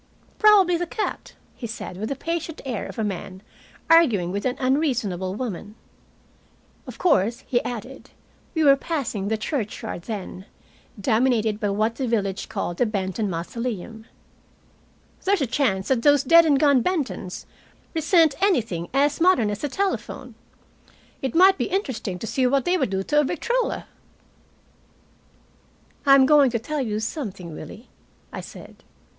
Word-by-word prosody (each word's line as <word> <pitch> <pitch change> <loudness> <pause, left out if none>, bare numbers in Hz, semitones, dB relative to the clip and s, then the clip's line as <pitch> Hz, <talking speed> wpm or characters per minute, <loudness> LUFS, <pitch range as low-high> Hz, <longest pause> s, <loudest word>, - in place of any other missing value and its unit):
"Probably 395 -5 +6
the 350 +1 -3
cat," 425 - -4 0.2
he 235 - -6
said, 220 -4 -7
with 215 +3 -4
the 275 - -2
patient 330 +2 -4
air 245 -6 -3
of 195 - -10
a 220 - -1
man 190 -1 -5 0.4
arguing 235 - +4
with 200 +2 -3
an 250 - -2
unreasonable 245 - 0
woman. 210 -3 -5 1.1
"Of - - -9
course," 235 - +2
he 240 -1 0
added 245 +3 -7 0.5
we 320 - +2
were 280 -2 +7
passing 265 - -3
the 220 +1 0
churchyard 215 - -4
then, 195 -3 -6 0.5
dominated 220 -1 +1
by 205 - -1
what 215 +3 0
the 265 - -2
village 200 -4 -1
called 175 - -3
the 245 - +2
Benton 200 0 -2
"mosolem" 220 +4 -5 1.2
"there's 395 0 +2
a 275 - +1
chance 225 -7 0
that 260 -3 +2
those 290 +1 +4
dead 335 +3 +6
and 285 -3 +4
gone 280 -4 +4
Bentons 280 - -3 0.5
resent 325 -1 +3
anything 225 - 0
as 290 +3 +2
modern 325 - +4
as 205 - -6
a 290 - -1
telephone. 390 +6 -3 0.9
It 265 -3 -3
might 380 +3 +6
be - - +1
interesting 260 - -3
to 200 - -6
see 255 +3 +1
what 275 +1 +1
they 355 - +2
would 270 - 0
do 190 0 -2
to 295 +8 +2
a - - +4
victrola." 470 - -1 2.2
"I'm 275 -1 +7
going 285 -1 +5
to 235 - -1
tell 290 +6 -3
you 215 -4 -2
something, 205 - -5
Willie," 225 +9 -10 0.5
I - - -5
said. - - -12
245 Hz, 150 wpm, -23 LUFS, 210-300 Hz, 2.2 s, were